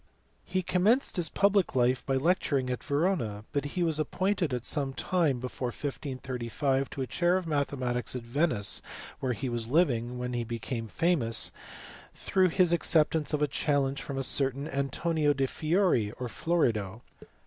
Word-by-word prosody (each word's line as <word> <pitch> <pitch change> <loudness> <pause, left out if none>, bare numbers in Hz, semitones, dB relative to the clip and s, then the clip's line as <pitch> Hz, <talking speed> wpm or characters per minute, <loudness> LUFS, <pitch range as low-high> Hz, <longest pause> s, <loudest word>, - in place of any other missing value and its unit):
He 185 0 -1
commenced 205 +10 +2
his 170 -3 +1
public 200 -5 +2
life 125 0 +2
by 135 - 0
lecturing 140 -4 +1
at 125 - -2
Yerona, 140 - -1
but 145 0 0
he 180 - +2
was 160 -2 +1
appointed 185 +1 0
at 125 -1 -3
some 140 -3 -2
time 155 -2 +1
before 125 0 -4
1535 130 0 -2
to 135 - -4
a - - -2
chair 175 +6 +2
of 185 - -3
mathe 145 -3 -1
matics 125 -1 -2
at 125 - -4
Venice 120 -4 0 0.4
where 130 -2 -1
he 135 +3 -4
was 120 -2 -2
living 125 -5 +1
when 125 0 -3
he 120 -1 -1
became 115 0 -4
famous 145 -5 +1 0.6
through 185 -1 +2
his 175 0 +3
acceptance 160 -2 +2
of 150 -1 +1
a - - +3
challenge 140 -1 0
from 135 - -5
a 135 - -1
certain 135 +2 +1
Antonio 145 +3 0
del 135 -1 0
Fieri 155 - +1
(or 125 - -5
Florida). 115 - 0
140 Hz, 165 wpm, -29 LUFS, 125-165 Hz, 0.6 s, his